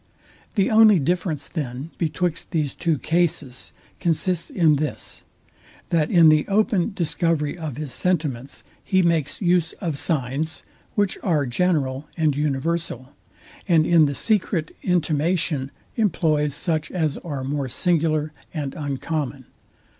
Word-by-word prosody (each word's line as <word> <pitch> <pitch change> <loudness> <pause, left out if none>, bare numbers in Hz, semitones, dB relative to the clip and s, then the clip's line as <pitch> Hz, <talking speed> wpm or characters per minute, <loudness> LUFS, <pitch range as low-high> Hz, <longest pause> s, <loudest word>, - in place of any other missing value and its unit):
The 195 -1 +2
only 215 -2 +7
difference, 165 -1 -1
then, 140 -1 -5
betwixt 165 +1 -1
these 155 -5 -1
two 165 -3 0
cases 155 -6 -1 0.3
consists 170 +1 0
in 160 -5 +3
this, 150 +1 -4 0.7
that 160 -2 +2
in 165 -3 +7
the 155 -1 +4
open 210 -1 +2
discovery 165 -3 0
of 155 -7 -6
his 150 -4 -4
sentiments 150 -8 -1 0.2
he 190 -2 +2
makes 165 0 0
use 175 -2 +2
of 160 -7 -3
signs, 150 +1 -1 0.3
which 205 -2 0
are 155 -7 +1
general 135 0 0
and 155 -4 +2
universal; 145 -2 -2 0.5
and 165 -4 +4
in 165 -2 +5
the 140 -1 -1
secret 185 - 0
intimation 160 -4 +1 0.3
employs 155 - +1
such 155 -1 -1
as 160 -5 -1
are 145 -6 -5
more 140 0 -2
singular 155 -1 +1 0.2
and 145 -3 -3
uncommon. 145 -2 -3
155 Hz, 125 wpm, -23 LUFS, 145-175 Hz, 0.7 s, only